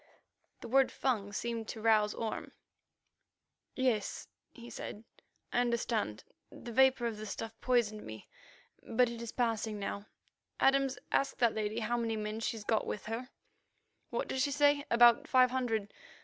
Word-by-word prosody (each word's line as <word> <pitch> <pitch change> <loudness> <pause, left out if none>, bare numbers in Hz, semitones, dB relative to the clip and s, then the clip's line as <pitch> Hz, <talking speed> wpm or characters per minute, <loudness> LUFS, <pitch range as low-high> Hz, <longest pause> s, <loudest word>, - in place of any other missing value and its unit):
The - - -7
word 270 +2 +4
Fung 215 -7 -1
seemed 230 +2 -3
to 225 - -6
rouse 215 -1 +3
Orme. 225 -1 -4 1.2
"Yes," 250 -6 0 0.2
he 235 -1 -12
said; 220 -2 -7 0.5
"I - - +3
understand. 235 - -1 0.3
The 240 - -9
vapour 265 0 +4
of 225 -2 -2
the 215 0 -6
stuff 225 +2 -5
poisoned 235 -4 +1
me, 110 -1 -9 0.5
but 235 +1 +2
it 235 -1 -7
is 230 -1 -5
passing 225 -3 -1
now. 200 +1 -5 0.5
Adams, 270 -1 +3
ask 275 - +1
that 235 -3 +3
lady 215 +1 -2
how 235 +2 0
many 225 -2 -1
men 215 +1 -3
she's 225 -1 -3
got 220 +1 0
with 210 - -4
her. 230 +4 -4 0.8
What - - -2
does 265 - -1
she 285 - +2
say? 285 0 +3
About 235 0 +6
five 255 -1 +5
hundred? 225 -5 -1
230 Hz, 155 wpm, -32 LUFS, 215-250 Hz, 1.2 s, About